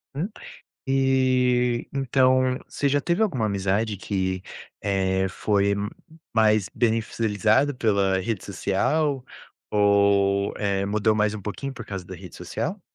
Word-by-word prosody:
Hum. 165 +8 -2 0.6
E, 130 -2 +2
então, 130 -1 +2
você 140 - -1
já 145 +1 +2
teve 170 +7 0
alguma 130 - +1
amizade 100 +2 0
que, 95 -1 -2 0.4
eh, 95 -1 +1
foi 100 +2 +1 0.6
mais 110 -3 +3
beneficiada 115 +3 +1
pela 100 -6 +1
rede 105 0 -3
social, 125 - 0 0.5
ou, 100 -1 +3
eh, 100 -1 0
mudou 105 +2 +1
mais 105 0 +1
um 105 - -6
pouquinho 110 +8 -5
por 120 -4 -9
causa 95 -2 -6
da 95 - -9
rede 90 -3 -11
social? - - -4
105 Hz, 125 wpm, -24 LUFS, 100-130 Hz, 0.6 s, mais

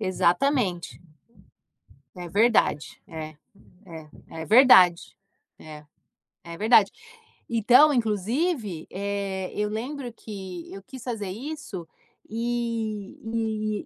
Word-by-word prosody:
Exatamente. 185 0 0 1.2
É 175 -1 -8
verdade. 215 -7 +1
É. 155 -1 -8 0.5
É. 160 -3 -10 0.3
É - - -5
verdade. 190 -6 +6 0.4
É. 150 -1 -12 0.6
É 170 -1 -9
verdade. 215 -1 +5 0.6
Então, 245 +6 +5
inclusive, 225 - -1
eh, 195 -1 -3
eu 210 0 -1
lembro 245 +4 -5
que 190 -6 -9
eu 195 - -9
quis 260 +4 -11
fazer 220 -6 -4
isso 220 - -7 0.4
e 225 -2 -3
210 Hz, 90 wpm, -25 LUFS, 185-235 Hz, 1.2 s, verdade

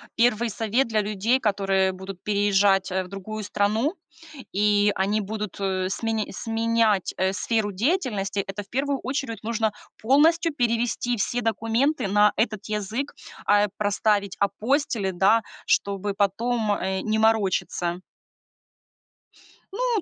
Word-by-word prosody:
1 235 -1 +2
совет 225 +4 0
для 215 -2 +1
людей, 215 +5 +1
которые 195 -3 +1
будут 190 0 -9
переезжать, 200 -2 +2
э, 190 0 0
в - - -11
другую 210 +3 -6
страну 215 - 0 0.6
и 205 +1 +3
они 205 +3 0
будут, 210 -1 -5
э, 185 -1 -1
смен 220 0 -1
сменять, 225 -3 +1
э, 190 +1 +1
сферу 210 +1 -1
деятельности, 210 - -1
это, 195 +1 -5
в - - -21
первую 275 +2 -1
очередь, 255 -4 -3
нужно 220 -1 0 0.3
полностью 310 +6 +3
перевести 240 -1 0
все 240 +4 -1
документы 225 +4 0
на 210 +1 +4
этот 215 -2 -1
язык, 215 +6 -3 0.3
а, 205 0 +4
проставить 205 -1 0
апостили, 220 -1 0
да, 195 +5 +3 0.2
чтобы 200 0 0
потом, 215 +3 0
э, 190 -1 -1
не 215 0 0
морочиться. 195 -5 +1 1.7
Ну, 475 -2 0
215 Hz, 125 wpm, -24 LUFS, 195-230 Hz, 1.7 s, на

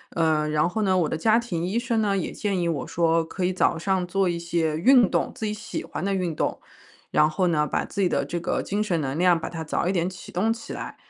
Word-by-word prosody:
呃， 155 -2 +2
然 150 +1 +2
后 200 +5 -2
呢， 190 -3 +2
我 170 -4 +2
的 - - -2
家 215 +7 +3
庭 195 -9 -2
医 190 +6 -1
生 235 -2 0
呢， 200 -2 +1
也 185 - -2
建 200 -3 -2
议 170 - 0
我 160 -4 -2
说 165 -1 +2
可 180 +3 -3
以 185 - 0
早 180 - +2
上 185 +2 0
做 195 +1 +1
一 170 -1 -1
些 170 -2 -1
运 240 +4 +5
动， 170 - 0
自 220 - -4
己 210 - -1
喜 215 - -6
欢 - - -6
的 200 +1 0
运 180 -4 -1
动。 - - -1 0.5
然 150 - +4
后 170 +4 0
呢， 155 -3 +2
把 - - -1
自 200 - -4
己 190 - +4
的 140 - 0
这 170 +5 -3
个 170 - -1
精 205 +2 -1
神 180 -6 0
能量 165 +5 +2
把 - - -5
它 165 -1 -5
早 160 - -1
一 - - +2
点 175 -2 0
启 185 0 -9
动 220 +5 +1
起 230 - -8
来， - - -6
175 Hz, 290 characters per minute, -25 LUFS, 165-195 Hz, 0.5 s, 运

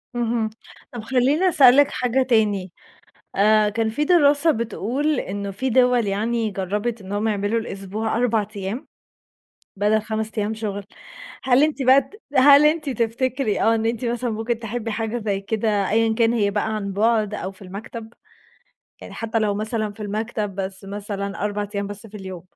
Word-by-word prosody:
اهم، 230 -2 0 0.4
طب 240 - -5
خلّيني 265 +9 +2
أسألِك 280 -3 +6
حاجة 255 +1 +1
تاني، 210 -6 +1 0.7
آآ 215 +1 +4
كان 220 +2 -1
في 295 +7 -1
دراسة 305 -2 +4
بتقول 250 +4 -1
إنه 200 +1 -4
في 255 +7 -3
دوَل 250 -2 +3
يعني 220 +3 -1
جرّبت 205 +4 -3
إنهم 205 +3 -2
يعملوا 205 +2 0
الأسبوع 210 +1 -4
4 230 -3 +1
أيام، 200 +8 -4 0.9
بدل 210 +2 +2
5 220 0 -3
أيام 210 +1 0
شغل، 205 -2 -4 0.6
هل 260 +1 +4
أنتِ 300 -2 0
بقى 260 +2 +6
ت 270 +11 -16 0.2
هل 285 +2 +7
أنتِ 305 -1 +2
تفتكري 240 0 -1
آه 225 - +4
إن 225 0 -1
أنتِ 230 +1 -1
مثلًا 240 +1 -1
ممكن 225 +1 -2
تحبي 225 0 -4
حاجة 225 +2 -2
زي 200 -2 -1
كده، 205 -1 0
أيًا 225 +1 +2
كان 230 0 +3
هي 205 -4 +1
بقى 215 +1 -1
عن 200 -2 -4
بُعد 215 0 +1
أو 195 -2 -4
في 190 - -20
المكتب؟ 220 +4 -8 0.9
يعني - - -10
حتّى 225 0 -2
لو 210 -2 +1
مثلًا 215 0 -2
في 210 - -17
المكتب 210 -1 -3
بس 190 0 -5
مثلًا 200 0 -5
4 205 0 -2
أيام 200 0 -2
بس 205 +2 -8
في 215 0 -11
اليوم؟ 190 -3 -8
220 Hz, 170 wpm, -22 LUFS, 205-240 Hz, 0.9 s, هل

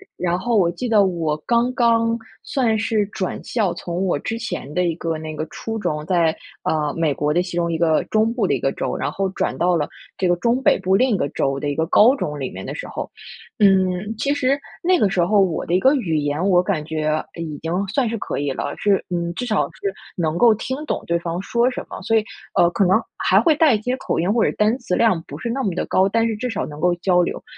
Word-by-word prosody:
然 175 0 -1
后 235 +2 0
我 175 -3 +4
记 180 +9 -4
得 210 -3 +4
我 165 -5 -1
刚 240 +1 +2
刚 230 -2 +2 0.3
算 230 -5 +1
是 220 -1 +1
转 190 -2 -4
校， 210 -7 0
从 175 +2 -3
我 175 -6 0
之 225 - -3
前 150 - -5
的 180 - +2
一 170 -2 +1
个 165 -2 -2
那 155 0 -6
个 155 - -3
初 225 0 -5
中 150 -6 -2
在， 170 -3 +2 0.3
呃， 150 -2 0
美 165 -3 +1
国 150 +1 0
的 175 - +3
其 175 -1 -5
中 170 -1 0
一 - - -1
个 160 -1 +2
中 220 +1 +3
部 235 -4 0
的 - - +1
一 - - 0
个 135 - 0
州， - - -3
然 - - -2
后 195 0 -1
转 - - -2
到 180 0 +2
了 150 -3 -1 0.3
这 185 - +2
个 175 - +3
中 235 +8 +1
北 - - +4
部 190 0 +2
另 255 +5 +3
一 - - 0
个 140 - 0
州 135 0 -1
的 145 - -3
一 140 - -2
个 160 - +1
高 235 +9 +6
中 150 - -4
里 130 - -4
面 - - -8
的 - - -6
时 - - -6
候。 - - -5 0.5
嗯， 190 0 +3
其 280 +4 +1
实 275 +1 +1 0.2
那 360 0 +3
个 200 - +3
时 175 -3 +2
候 210 +2 +3
我 180 -4 0
的 170 - -2
一 185 - +4
个 265 +6 +4
语 165 - 0
言， 145 +5 0
我 180 -2 +5
感 180 -6 -2
觉 155 -1 -1
已 160 -3 -6
经 165 - -2 0.2
算 240 +4 0
是 230 - -2
可 - - -4
以 140 -1 -1
了， 145 - -3
是 200 -2 +2
嗯， 170 -1 -2
至 250 - -4
少 215 - +2
是 195 - -4 0.2
能 165 -1 -1
够 235 0 +6
听 260 +5 -4
懂 - - -3
对 170 0 +2
方 170 +1 -4
说 235 +4 +1
什 - - -5
么， - - -7
所 225 - +1
以， 220 - +3 0.3
呃， 175 - +4
可 190 +2 +1
能 190 +5 +4 0.2
还 - - +3
会 320 -3 +4
带 305 -5 +5
一 210 - 0
些 250 +3 -1
口 - - -2
音 180 +4 +1
或 230 0 +2
者 - - +1
单 215 +4 +3
词 235 -8 -2
量 220 -7 +3
不 145 - -7
是 235 - -4
那 265 +3 -1
么 195 -5 -1
的 - - -1
高， 190 +1 +3
但 230 +3 +1
是 220 - -2
至 250 +2 -3
少 - - -2
能 150 0 -9
够 180 +1 +3
交 180 0 +2
流， - - -4
185 Hz, 285 characters per minute, -21 LUFS, 165-230 Hz, 0.5 s, 高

